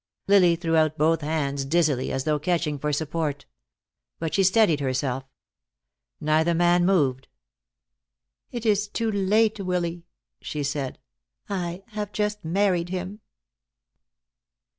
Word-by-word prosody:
Lily 185 -4 +5
threw 165 -1 -1
out 155 -1 +2
both 160 +1 +2
hands 145 -2 -1
dizzily, 145 -3 +1
as 135 - -2
though 150 0 0
catching 155 -2 -1
for 150 +2 -1
support. 150 -1 -2 0.7
But 160 -2 -4
she 195 - +3
steadied 190 -5 +4
herself. 130 -1 -2 0.9
Neither 160 +3 +2
man 175 +1 +3
moved. 135 -9 +1 1.2
"It 240 -1 -6
is 210 -1 +2
too 225 +2 -2
late, 210 +2 +2
Willy," 175 -2 -2 0.3
she 150 -1 -4
said. 140 -2 -3 0.5
"I 180 -1 -3
have 210 -2 -5
just 210 0 -2
married 175 0 +1
him." 185 +3 -5
170 Hz, 120 wpm, -25 LUFS, 150-195 Hz, 1.2 s, Lily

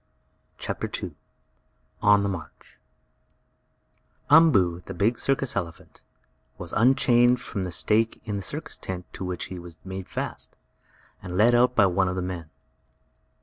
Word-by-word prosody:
CHAPTER - - -4
II - - -5 0.9
ON 105 -1 +5
THE 100 - 0
MARCH 85 -5 -9 1.5
Umboo, 100 - +5
the - - -6
big 110 +4 +1
circus 135 -1 0
elephant, 85 -4 -6 0.6
was 85 -2 -5
unchained 120 0 +4
from 100 -5 -4
the 90 - -5
stake 110 +6 +1
in 105 -2 -3
the 100 - -3
circus 150 - -4
tent 90 -1 -6
to - - -6
which 90 -1 -3
he 90 - -6
was 85 -1 -11
made 95 -1 -6
fast, - - -5 0.7
and 90 0 -5
led 115 +4 +5
out 125 +1 +4
by 100 - +6
one 95 0 +2
of 90 - -2
the 90 - -2
men. 90 -3 -5
100 Hz, 145 wpm, -25 LUFS, 90-120 Hz, 1.5 s, by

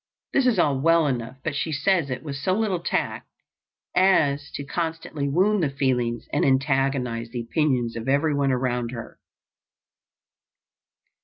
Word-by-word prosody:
This 270 -2 +3
is 235 -5 +3
all 145 -6 +2
well 165 +2 +4
enough, 125 -2 -3
but 155 - -2
she 160 - -2
says 155 +1 +1
it 130 - -4
with 145 -3 -5
so 140 +7 0
little 200 -3 0
tact 170 - -2 0.7
as 145 -7 +3
to 140 - -4
constantly 160 -2 -3
wound 190 +7 +2
the 155 - +1
feelings 125 -4 -1
and - - +2
antagonize 135 -3 +1
the 120 0 -4
opinions 125 -2 0
of 115 +2 -5
everyone 140 -1 +2
around 125 -2 -1
her. 115 -2 -8
140 Hz, 145 wpm, -24 LUFS, 130-165 Hz, 0.7 s, well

